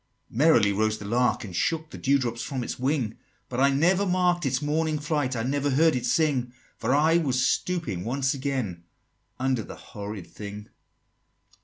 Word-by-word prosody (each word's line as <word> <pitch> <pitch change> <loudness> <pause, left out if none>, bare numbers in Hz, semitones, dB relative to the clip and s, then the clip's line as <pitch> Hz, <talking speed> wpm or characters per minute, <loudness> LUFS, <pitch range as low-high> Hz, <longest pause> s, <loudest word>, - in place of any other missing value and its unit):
XXIX. - - -10
"Merrily 120 -9 +5
rose 110 +1 +1
the 105 - -9
lark, 120 +4 +1
and 95 -5 -8
shook 160 - -1
The - - -8
dew 140 +1 +3
drop 120 -3 -3
from 130 -2 -3
its - - -5
wing; 130 -4 -1 0.3
But 125 - -3
I 140 +1 +5
never 175 +8 +3
mark'd 180 -3 +2
its 130 -1 0
morning 155 +1 0
flight, 145 -3 -1
I 115 - -1
never 140 +3 0
heard 155 +3 +4
it 125 - -1
sing: 135 -6 +1 0.2
For 125 +4 0
I 160 +3 +4
was 130 -6 +1
stooping 165 - -1
once 135 +4 0
again 130 -11 -3 0.6
Under 130 -2 +1
the - - -9
horrid 100 -2 -8
thing." 105 +4 -9
130 Hz, 180 wpm, -26 LUFS, 115-150 Hz, 0.6 s, Merrily